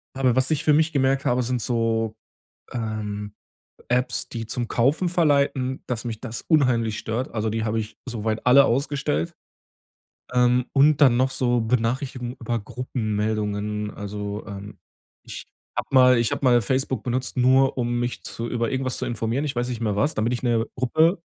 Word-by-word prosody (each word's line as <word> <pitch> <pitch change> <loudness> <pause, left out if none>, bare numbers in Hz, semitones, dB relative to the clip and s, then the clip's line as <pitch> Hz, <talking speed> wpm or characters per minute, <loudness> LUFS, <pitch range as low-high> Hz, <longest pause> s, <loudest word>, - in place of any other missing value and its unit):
Aber 130 -3 +2
was 130 +2 +1
ich 155 -1 0
für 150 - +4
mich 155 +1 +2
gemerkt 135 0 +1
habe, 125 +1 +2
sind 125 0 -1
so, 115 -1 0 0.6
ähm, 105 -3 -4 0.6
Apps, 125 0 0
die 115 -1 -5
zum 120 +2 -3
Kaufen 140 +12 +1
verleiten, 140 -6 +1
dass 120 -3 -3
mich 115 -3 -5
das 115 -2 -6
unheimlich 120 -8 +2
stört. 115 +4 -3
Also, 110 -1 -1
die 110 +1 -2
habe 110 0 0
ich 110 0 -6
soweit 110 -2 -3
alle 135 +2 +7
ausgestellt. 135 - -1 1.0
Ähm, 125 0 +3
und 145 +2 +4
dann 130 -4 +6
noch 130 +1 +2
so 120 -2 +1
Benachrichtigungen 125 +2 -1
über 120 0 -2
Gruppenmeldungen. 105 -3 -2
Also, 105 0 -5
ähm, 100 0 -8 0.5
ich - - -8 0.3
habe - - -1
mal 125 -2 +6
ich 115 -1 +1
habe - - -3
mal 120 -2 +5
Facebook 130 +4 -1
benutzt, 130 +1 -2
nur 130 +2 +4
um 120 0 0
mich 120 0 -3
zu 115 0 -5
über 120 -1 -1
irgendwas 130 -1 -2
zu - - -3
informieren, 120 +5 -2
ich 140 - -3
weiß 120 +1 -1
nicht 120 -2 -4
mehr 105 -3 0
was, 145 +9 +1
da - - -2
bin 115 +3 +1
ich 125 - -3
'ner 115 -2 +1
Gruppe 160 +8 +2
120 Hz, 175 wpm, -24 LUFS, 110-130 Hz, 1.0 s, alle